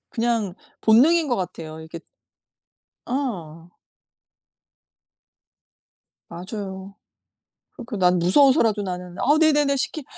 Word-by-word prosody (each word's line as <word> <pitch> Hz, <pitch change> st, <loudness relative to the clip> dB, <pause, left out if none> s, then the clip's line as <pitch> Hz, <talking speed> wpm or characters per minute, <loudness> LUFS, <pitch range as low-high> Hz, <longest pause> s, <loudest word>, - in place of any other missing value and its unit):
그냥 230 Hz, -5 st, -1 dB, 0.3 s
본능인 300 Hz, +9 st, +4 dB
것 245 Hz, -, 0 dB
같아요. 160 Hz, -4 st, -6 dB
이렇게 160 Hz, +1 st, -9 dB, 1.0 s
어. 175 Hz, -, -5 dB, 2.6 s
맞아요. 190 Hz, +1 st, -8 dB, 0.8 s
그렇게 230 Hz, -2 st, -8 dB
난 180 Hz, -1 st, +3 dB
무서워서라도 225 Hz, +2 st, +3 dB
나는 180 Hz, -2 st, -6 dB
"아 295 Hz, +4 st, +3 dB
네네네. 295 Hz, -3 st, +3 dB
시키 285 Hz, +3 st, -2 dB
210 Hz, 200 characters per minute, -22 LUFS, 180-265 Hz, 2.6 s, 본능인